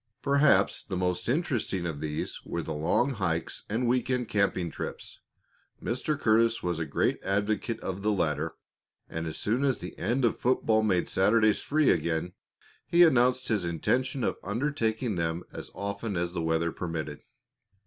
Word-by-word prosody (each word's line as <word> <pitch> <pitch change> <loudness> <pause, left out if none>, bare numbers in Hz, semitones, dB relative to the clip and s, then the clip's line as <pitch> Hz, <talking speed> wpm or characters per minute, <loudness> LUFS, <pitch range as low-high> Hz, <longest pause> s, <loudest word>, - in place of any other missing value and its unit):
Perhaps 140 +1 +3
the 95 - -4
most 90 +3 -1
interesting 125 - 0
of 80 -4 -3
these 75 0 -4
were - - -3
the - - -4
long 80 - +1
hikes 85 -8 -2
and 115 +4 0
week 125 +1 +1
end 125 -3 0
camping 100 -4 +1
trips. - - -6 0.6
Mr. 135 +5 -2
Curtis 115 0 +3
was 90 -2 -1
a 80 - -2
great 70 - +1
advocate 105 +3 -1
of 95 +1 -4
the 105 +1 +1
latter, 80 -4 -1 0.5
and 80 0 -4
as 80 - -5
soon 120 +6 0
as 135 -2 +2
the 90 - -8
end 120 +6 +1
of 115 - +2
football 115 -3 +2
made 95 -5 +1
Saturdays 110 +2 +3
free 155 -1 +3
again, 85 +1 -1 0.5
he 175 +1 +6
announced 130 -4 +4
his 105 -5 +1
intention 125 - 0
of - - 0
undertaking 115 -1 -1
them 85 +1 -1
as - - -7
often 100 0 -3
as 85 0 -1
the 85 - -2
weather 80 +1 +1
permitted. 80 -4 -4
105 Hz, 165 wpm, -28 LUFS, 85-125 Hz, 0.6 s, he